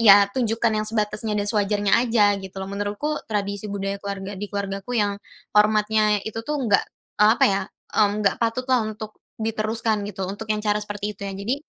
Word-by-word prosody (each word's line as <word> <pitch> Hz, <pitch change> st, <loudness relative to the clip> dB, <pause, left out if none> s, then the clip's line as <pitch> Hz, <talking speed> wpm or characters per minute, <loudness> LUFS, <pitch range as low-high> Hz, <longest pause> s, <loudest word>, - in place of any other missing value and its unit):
ya 205 Hz, -3 st, +8 dB
tunjukkan 230 Hz, -2 st, +1 dB
yang 215 Hz, -, -2 dB
sebatasnya 210 Hz, 0 st, -1 dB
dan 205 Hz, -, 0 dB
sewajarnya 205 Hz, -1 st, +1 dB
aja 225 Hz, -4 st, +4 dB
gitu 190 Hz, 0 st, -10 dB
loh. 190 Hz, 0 st, -4 dB
Menurutku, 205 Hz, +10 st, -2 dB
tradisi 205 Hz, -1 st, -2 dB
budaya 200 Hz, 0 st, -3 dB
keluarga 200 Hz, 0 st, -5 dB
di 205 Hz, -, -4 dB
keluargaku 200 Hz, +3 st, -3 dB
yang 205 Hz, -1 st, 0 dB, 0.3 s
hormatnya 210 Hz, 0 st, +4 dB
itu 220 Hz, +1 st, -4 dB
tuh 290 Hz, +3 st, -2 dB
enggak, 205 Hz, -5 st, +3 dB, 0.4 s
eee, 210 Hz, -, +7 dB
apa -, -, +4 dB
ya, 195 Hz, 0 st, +3 dB, 0.3 s
mmm, 210 Hz, 0 st, +2 dB
enggak -, -, +3 dB
patut 230 Hz, +2 st, 0 dB
lah 250 Hz, -, +5 dB
untuk 215 Hz, 0 st, -8 dB, 0.2 s
diteruskan 220 Hz, 0 st, -1 dB
gitu, 195 Hz, -1 st, -4 dB
untuk 205 Hz, +4 st, -6 dB
yang 215 Hz, 0 st, -1 dB
cara 210 Hz, 0 st, +2 dB
seperti 205 Hz, 0 st, -4 dB
itu 200 Hz, 0 st, -6 dB
ya. 195 Hz, -, -5 dB
Jadi, 200 Hz, +6 st, -1 dB
210 Hz, 190 wpm, -23 LUFS, 200-220 Hz, 0.4 s, ya